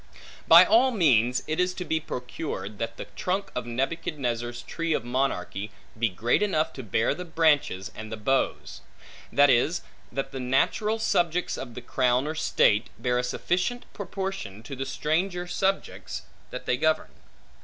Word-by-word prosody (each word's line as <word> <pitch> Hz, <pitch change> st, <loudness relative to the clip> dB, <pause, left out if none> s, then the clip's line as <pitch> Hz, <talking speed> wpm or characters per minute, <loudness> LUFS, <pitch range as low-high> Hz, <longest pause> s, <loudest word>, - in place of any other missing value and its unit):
By -, -, +10 dB
all 295 Hz, -6 st, +5 dB
means 125 Hz, -, +3 dB
it 155 Hz, +2 st, -2 dB
is 180 Hz, 0 st, +1 dB
to 180 Hz, -, -5 dB
be 160 Hz, -1 st, 0 dB
procured, 125 Hz, -7 st, -5 dB
that 115 Hz, 0 st, -3 dB
the -, -, -6 dB
trunk 190 Hz, +2 st, -2 dB
of 120 Hz, -1 st, -4 dB
Nebuchadnezzar's 120 Hz, -3 st, -2 dB
tree 165 Hz, +4 st, -2 dB
of 120 Hz, -, -1 dB
monarchy, 120 Hz, -5 st, -1 dB, 0.3 s
be 115 Hz, +1 st, +1 dB
great 110 Hz, -, +1 dB
enough 160 Hz, -6 st, +1 dB
to 130 Hz, -, -6 dB
bear 110 Hz, 0 st, +1 dB
the 180 Hz, -, -6 dB
branches 150 Hz, -, +1 dB
and 110 Hz, 0 st, -8 dB
the 110 Hz, -, -4 dB
boughs; 135 Hz, +6 st, -1 dB, 0.5 s
that 145 Hz, -1 st, +6 dB
is, 145 Hz, +8 st, +2 dB, 0.3 s
that 135 Hz, 0 st, -3 dB
the 135 Hz, -, -5 dB
natural 135 Hz, -, +1 dB
subjects 175 Hz, -6 st, +1 dB
of 120 Hz, -3 st, -7 dB
the 125 Hz, -, -6 dB
crown 125 Hz, +1 st, +2 dB
or 155 Hz, -, -2 dB
state, 110 Hz, -8 st, +2 dB
bear 125 Hz, -1 st, 0 dB
a -, -, 0 dB
sufficient 180 Hz, -, -1 dB
proportion 190 Hz, -, -5 dB
to 135 Hz, +3 st, -7 dB
the 135 Hz, +1 st, -4 dB
stranger 175 Hz, +6 st, -1 dB
subjects, 190 Hz, +2 st, -2 dB, 0.3 s
that -, -, -7 dB
they 125 Hz, -, +1 dB
govern. 155 Hz, +4 st, +1 dB
135 Hz, 165 wpm, -27 LUFS, 120-175 Hz, 0.5 s, By